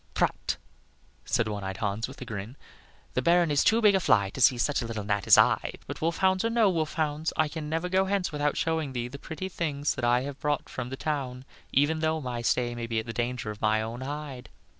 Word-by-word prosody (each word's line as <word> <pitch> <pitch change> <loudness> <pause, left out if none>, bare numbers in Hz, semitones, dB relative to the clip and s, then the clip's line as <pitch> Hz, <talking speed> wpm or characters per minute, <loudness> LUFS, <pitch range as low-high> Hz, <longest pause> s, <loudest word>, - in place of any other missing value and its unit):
"Prut," - - 0 0.7
said 115 - +1
one 105 -2 -4
eyed 95 0 -4
Hans, 105 +2 -1
with 130 - -11
a - - -11
grin, 110 +3 -6 0.6
"the 125 - +1
Baron 170 +2 +4
is 145 - +3
too 225 +1 +3
big 210 -1 +7
a 190 - +4
fly 100 - +3
to 130 - -6
see 125 +1 +6
such 140 +4 +1
a 115 - -4
little 110 -2 -4
gnat 100 -1 -1
as - - +8
I; - - +3
but - - -7
wolf 165 +1 0
hounds 190 0 +2
or 230 - +1
no 230 -4 +4
wolf 160 -3 -1
hounds, 155 0 -1
I 155 - +3
can 150 0 -6
never 165 +3 -1
go 190 +1 +2
hence 195 -2 0
without 145 -1 0
showing 160 -4 -1
thee 120 -1 -2
the 140 +2 -9
pretty 160 +6 -5
things 150 -5 -1
that 130 - -6
I 120 +1 +3
have 140 +1 -6
brought 150 0 -1
from 125 -1 -5
the 135 - -5
town, 135 -4 -3 0.3
even 145 +3 +2
though 160 0 +1
my 125 -4 -4
stay 120 +1 +1
be 115 -1 -2
at 110 - -1
the 115 - -5
danger 120 -1 -2
of 105 - -11
my 110 0 +3
own 115 +3 -5
hide." 135 -3 -6
140 Hz, 245 wpm, -28 LUFS, 120-160 Hz, 0.7 s, as